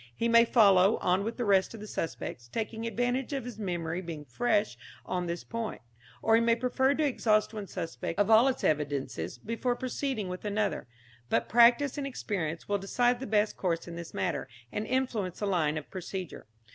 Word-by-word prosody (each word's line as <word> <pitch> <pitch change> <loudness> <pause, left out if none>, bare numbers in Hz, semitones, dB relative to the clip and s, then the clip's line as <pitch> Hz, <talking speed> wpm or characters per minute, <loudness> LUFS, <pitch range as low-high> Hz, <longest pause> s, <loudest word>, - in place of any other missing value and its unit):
He 230 - 0
may 230 0 +6
follow 200 -3 +5
on 185 +2 +1
with 225 +2 -4
the 245 - -1
rest 195 +1 +3
of - - -9
the 210 - -7
suspects, 145 - -5
taking 225 - -4
advantage 245 +4 -1
of 270 -4 -3
his 240 -3 -8
memory 175 -3 -2
being 165 -4 -7
fresh 215 +2 0 0.3
on 180 -1 -2
this 170 0 -4
point, 230 -1 -4 0.4
or 225 - +3
he 225 - +6
may 230 0 +4
prefer 260 +3 +1
to 310 - +1
exhaust 220 -5 +2
one 210 -2 -5
suspect 165 -1 -5
of 205 -1 +3
all 225 +4 +7
its 265 - -1
evidences 140 - -1
before 230 - -2
proceeding 255 -3 -3
with 180 0 -6
another; 210 - -1 0.4
but 115 - +1
practice 240 +5 +5
and 275 - -2
experience 175 - -3
will 205 0 0
decide 245 +5 +1
the 265 - -5
best 210 0 +1
course 170 -3 -1
in 170 - -7
this 170 -1 -7
matter, 175 -7 -2 0.2
and 210 +1 -3
influence 235 -8 -1
the 205 - -2
line 160 -6 +1
of 150 - -6
procedure. 185 - -6
210 Hz, 195 wpm, -29 LUFS, 180-235 Hz, 0.4 s, all